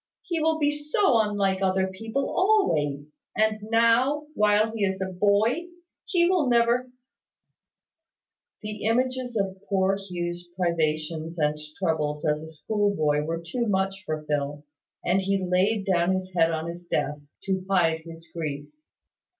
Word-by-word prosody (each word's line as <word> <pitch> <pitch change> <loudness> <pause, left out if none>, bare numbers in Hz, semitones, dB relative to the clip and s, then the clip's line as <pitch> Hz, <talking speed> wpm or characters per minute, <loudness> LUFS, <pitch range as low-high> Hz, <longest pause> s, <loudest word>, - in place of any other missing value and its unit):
He 340 -2 -2
will 320 0 +2
be 295 -1 +2
so 295 - +2
unlike 200 -3 +1
other 190 0 +2
people 225 +8 -3
always; 150 - +1 0.2
and 215 0 +2
now, 235 +6 +3
while 210 -1 +3
he 220 -2 -2
is 190 -1 0
a 190 -1 -3
boy, 210 - +2 0.4
he 345 -4 +3
will 350 -7 +2
never 240 +1 +3 0.9
" 325 0 -65
The 210 0 -5
images 250 +1 0
of 190 -2 -1
poor 195 0 +2
Hugh's 175 -2 -5
privations 160 -1 -1
and 150 -1 +1 0.2
troubles 155 -4 -1
as 150 0 +1
a 160 - -9
schoolboy 160 -3 0
were 165 +1 -3
too 235 +7 -2
much 195 0 0
for 155 -5 -3
Phil, 145 -1 -2 0.4
and 185 +2 +2
he 195 +1 +1
laid 195 +3 +2
down 185 -1 +2
his 185 0 -5
head 165 -2 +4
on 160 0 -2
his 170 +1 -8
desk, 145 -2 -3
to 190 -1 -1
hide 165 -4 +3
his 165 0 -11
grief. 145 -3 -4
190 Hz, 150 wpm, -26 LUFS, 165-225 Hz, 0.9 s, head